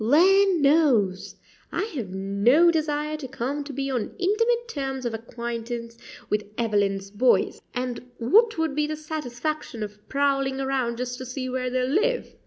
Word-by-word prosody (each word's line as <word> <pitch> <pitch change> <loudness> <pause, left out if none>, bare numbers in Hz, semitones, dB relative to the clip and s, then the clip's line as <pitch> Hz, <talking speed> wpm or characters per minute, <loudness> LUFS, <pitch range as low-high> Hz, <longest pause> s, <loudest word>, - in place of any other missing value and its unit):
Land 365 - +5
knows! 260 - +3 0.4
I - - -1
have 235 -10 -4
no 200 - +4
desire 305 -1 -1
to 290 -3 -6
come 270 +3 -3
to 290 - -6
be 275 0 -3
on 245 -5 -3
intimate 460 +5 +1
terms 270 - -4
of 235 - -1
acquaintance 235 0 -5 0.3
with 210 0 0
Evelyn's 200 -3 0
boys; 240 +5 +2
and 250 0 -4
what 435 - +4
would 320 -3 0
be 300 +1 0
the 310 - -3
satisfaction 305 -4 -4
of 210 0 -10
prowling 275 -1 +1
around 265 -3 -1
just 250 0 -4
to 255 - -6
see 255 0 -4
where 255 0 -2
they 255 0 0
live? 455 - 0
265 Hz, 160 wpm, -25 LUFS, 235-305 Hz, 0.4 s, Land